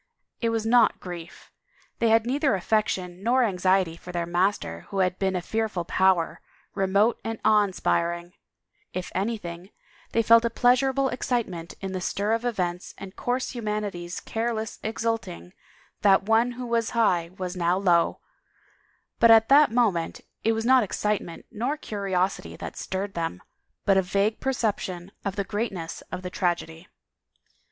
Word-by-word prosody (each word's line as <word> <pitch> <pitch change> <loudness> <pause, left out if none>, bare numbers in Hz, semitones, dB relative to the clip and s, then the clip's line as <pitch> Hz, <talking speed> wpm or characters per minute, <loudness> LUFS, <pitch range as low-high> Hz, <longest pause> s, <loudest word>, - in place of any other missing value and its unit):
It 230 - +1
was 225 -1 -1
not 230 -1 +4
grief; 175 -2 -9 0.5
they 230 - +3
had 225 0 +4
neither 275 -1 +1
affection 185 -2 -1
nor 250 +4 +3
anxiety 185 -4 +2
for 180 - -10
their 175 -1 -2
master 175 - -1
who 195 - -5
had 185 -1 +1
been 190 -1 0
a 180 - -2
fearful 215 -4 -2
power, 185 -2 +2 0.3
remote 200 +4 +2
and 225 0 -3
awe 215 -1 +6
inspiring; 175 -2 -1 0.6
if 180 0 -4
anything 190 -3 -3 0.4
they 230 - +2
felt 230 +1 +6
a 235 - +1
pleasurable 265 +3 +3
excite 245 -2 -1
ment 170 -2 -8
in 195 -1 -4
the 185 -1 -3
stir 200 +4 -1
of 230 +1 0
events 180 -7 -2
and 190 0 -9
coarse 250 +1 -2
humanity's 210 -7 -4
careless 225 -1 -3
exulting 220 - -3 0.5
that 195 -1 +5
one 225 +4 +2
who 250 +1 -6
was 235 -1 0
high 175 -7 +2
was 185 0 -4
now 175 0 +1
low, 175 -3 +2 1.0
but 230 - +6
at 225 0 +7
that 290 +2 +7
moment 215 -9 0 0.2
it 225 - +3
was 225 0 -2
not 260 +1 +6
excitement 210 -4 -2
nor 250 +8 -2
curiosity 195 -6 -2
that - - -7
stirred 195 +1 -4
them 165 - -3 0.5
but 195 - +4
a - - +5
vague 200 +4 0
perception 200 -8 -2
of 195 -1 -3
the 200 - -1
greatness 195 -5 -4
of 185 0 -5
the 180 - -5
tragedy. 175 -1 -2
200 Hz, 155 wpm, -26 LUFS, 180-230 Hz, 1.0 s, at